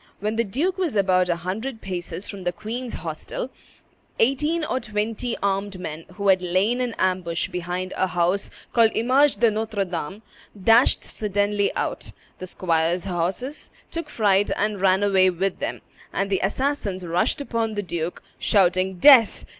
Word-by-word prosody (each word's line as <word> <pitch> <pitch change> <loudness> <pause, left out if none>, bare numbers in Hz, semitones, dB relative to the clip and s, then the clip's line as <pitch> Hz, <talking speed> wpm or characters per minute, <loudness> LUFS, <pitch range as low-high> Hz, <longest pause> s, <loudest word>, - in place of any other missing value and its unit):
When 210 +2 -2
the 230 - +2
duke 310 - -1
was 340 -10 -1
about 185 -2 +3
a 170 - +2
hundred 215 +9 -4
paces 185 0 -5
from 200 -2 -8
the 175 - 0
queen's 230 +6 -5
hostel, - - -5 0.7
eighteen 300 +7 +1
or 260 -4 -1
twenty 220 +2 -2
armed 195 -1 -1
men, 160 -2 -6
who 200 +1 0
had 185 -1 +5
lain 190 +8 +1
in 245 -2 -2
ambush 180 -2 0
behind 180 +1 -4
a 190 - +1
house 180 +2 0 0.2
called 230 -2 +4
Image 265 +5 +3
de 235 -2 +4
Notre 215 -2 -2
Dame, 180 +3 -5 0.4
dashed 225 +6 +4
suddenly 205 -1 0
out; - - -3 0.3
the 185 - -6
squires' 170 0 0
horse 190 - -3 0.2
took 335 -2 -5
fright 205 -5 +2
and 210 -2 -1
ran 190 +1 +3
away 190 -2 +4
with 185 +2 -2
them; - - -4 0.3
and 200 0 -2
the 195 - +1
assassins 200 -3 -1
rushed 170 +9 0
upon 230 -5 -2
the 205 - -2
duke, 170 -1 -4 0.2
shouting, 185 -1 +2
"Death! 250 -1 +6
200 Hz, 160 wpm, -23 LUFS, 185-230 Hz, 0.7 s, Death